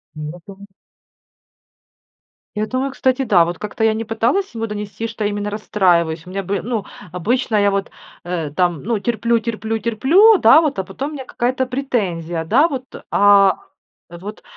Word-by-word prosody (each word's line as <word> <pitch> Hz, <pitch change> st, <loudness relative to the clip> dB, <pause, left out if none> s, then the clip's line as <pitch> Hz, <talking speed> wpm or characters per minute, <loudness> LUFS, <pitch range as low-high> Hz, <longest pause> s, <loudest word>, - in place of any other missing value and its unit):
Нету. 170 Hz, +6 st, -9 dB, 2.0 s
Я 215 Hz, +1 st, -1 dB
думаю, 260 Hz, +4 st, -2 dB
кстати, 260 Hz, 0 st, 0 dB
да, 185 Hz, -7 st, +4 dB
вот 175 Hz, -1 st, -5 dB
как-то 210 Hz, +2 st, -5 dB
я 220 Hz, -, +3 dB
не 225 Hz, +1 st, -3 dB
пыталась 235 Hz, -, -1 dB
ему 225 Hz, 0 st, -3 dB
донести, 210 Hz, 0 st, -5 dB
что 220 Hz, -1 st, -5 dB
именно 205 Hz, 0 st, -2 dB
расстраиваюсь, 175 Hz, -6 st, +1 dB
у -, -, -10 dB
меня 195 Hz, +1 st, -3 dB
бы 195 Hz, +1 st, -2 dB
Ну, 225 Hz, -3 st, -3 dB, 0.3 s
обычно 220 Hz, +6 st, -1 dB
я 205 Hz, -1 st, +3 dB
вот, 195 Hz, 0 st, -2 dB, 0.3 s
э, 170 Hz, -4 st, -3 dB
там, 175 Hz, -1 st, 0 dB
ну, 225 Hz, +1 st, -1 dB
терплю, 235 Hz, +2 st, 0 dB
терплю, 225 Hz, 0 st, -3 dB
терплю, 280 Hz, -, +5 dB
да 300 Hz, +2 st, +6 dB
вот, 300 Hz, -10 st, -1 dB
а 190 Hz, -, -1 dB
потом 270 Hz, +11 st, -5 dB
у -, -, -10 dB
меня 265 Hz, -3 st, -6 dB
какая-то 255 Hz, +1 st, -1 dB
претензия, 185 Hz, -11 st, -2 dB
да 265 Hz, -, +3 dB
вот. 260 Hz, -4 st, -5 dB, 0.3 s
А, 200 Hz, -1 st, +5 dB, 0.5 s
вот, 195 Hz, +5 st, -9 dB
210 Hz, 165 wpm, -19 LUFS, 190-240 Hz, 2.0 s, да